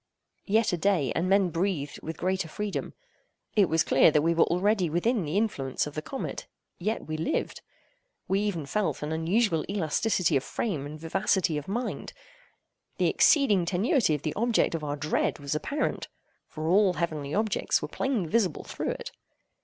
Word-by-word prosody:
Yet 220 0 +2
a - - +1
day, 170 -7 +1
and 185 - 0
men 195 -2 +3
breathed 165 -4 -2
with 160 0 -6
greater 185 -1 -1
freedom. 205 +5 -4 0.6
It 200 -5 +4
was 160 0 +3
clear - - +5
that 150 -1 +2
we 165 +1 +3
were 170 - +4
already 185 0 +1
within 200 +7 +1
the 150 +6 -1
influence 145 - -1
of 150 - -7
the 155 - -3
comet; 270 - -5 0.3
yet 215 +5 -2
we 155 0 -4
lived. 160 - -2 0.7
We 195 +2 +1
even 200 -7 -2
felt 205 +1 -1
an 150 - -3
unusual 165 +2 +1
elasticity 185 -1 +1
of 135 - +2
frame 155 -11 -3
and 155 +1 -9
vivacity 175 0 +1
of 150 -1 -4
mind. 235 +6 -3 0.8
The - - +2
exceeding 265 - +4
tenuity 190 - +2
of 145 - -6
the 155 - -2
object 235 -3 +1
of 165 -2 -3
our 145 -1 -2
dread 150 +2 0
was 140 0 -4
apparent; 280 - -2 0.4
for 155 0 -6
all 190 +2 +4
heavenly 155 -5 -3
objects 215 0 +1
were - - -2
plainly 245 -10 -1
visible 215 0 +1
through - - -4
it. - - -8
180 Hz, 175 wpm, -27 LUFS, 155-210 Hz, 0.8 s, clear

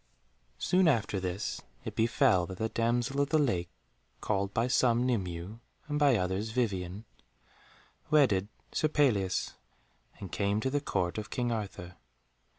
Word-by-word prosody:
Soon 180 - +3
after 110 -8 +1
this 95 +3 -3 0.2
it - - -5
befell 115 -5 +3
that 95 - -7
the 110 +3 -1
damsel 120 +5 0
of 140 - 0
the 155 - +3
lake, 95 - +1 0.5
called 100 -2 -1
by 115 +3 +1
some 125 -1 +3
Nimue 95 -3 -2 0.3
and 150 0 -1
by 145 -4 +5
others 95 +3 -1
Vivien, 100 -4 -2 1.0
wedded 125 -11 +4 0.2
Sir 155 - +1
Pelleas, 120 -12 +1 0.7
and 95 - -8
came 100 +1 0
to 130 +4 -1
the 145 +1 0
Court 90 - -1
of 105 - -7
King 120 -1 -1
Arthur. 95 -5 -5
110 Hz, 145 wpm, -30 LUFS, 95-130 Hz, 1.0 s, by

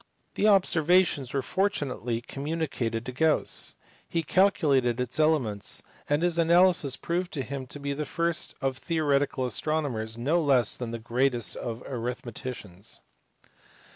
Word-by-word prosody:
The 210 - +2
observations 175 - +3
were 135 - 0
fortu 190 -5 0
nately 120 -2 -3
communicated 135 -5 -3
to 130 - -4
Gauss; 155 +5 +2 0.3
he 165 -1 -1
calculated 145 - +2
its 125 +3 -2
elements, 135 -10 +1 0.3
and 145 +3 +2
his 175 -1 +2
analysis 170 -5 +4
proved 175 +1 -2
him 135 -1 -4
to 145 - -6
be 140 0 -2
the 150 +2 -3
first 170 +2 -1
of 135 -1 -1
theoretical 145 -5 0
astro 155 +7 0
nomers 110 -6 -4
no 150 +9 +1
less 130 -7 +3
than 120 -2 -5
the 115 - -4
greatest 120 +2 0
of 115 +1 -5
" - - -17
arithmeticians." 120 -5 -5
140 Hz, 140 wpm, -27 LUFS, 120-160 Hz, 0.3 s, analysis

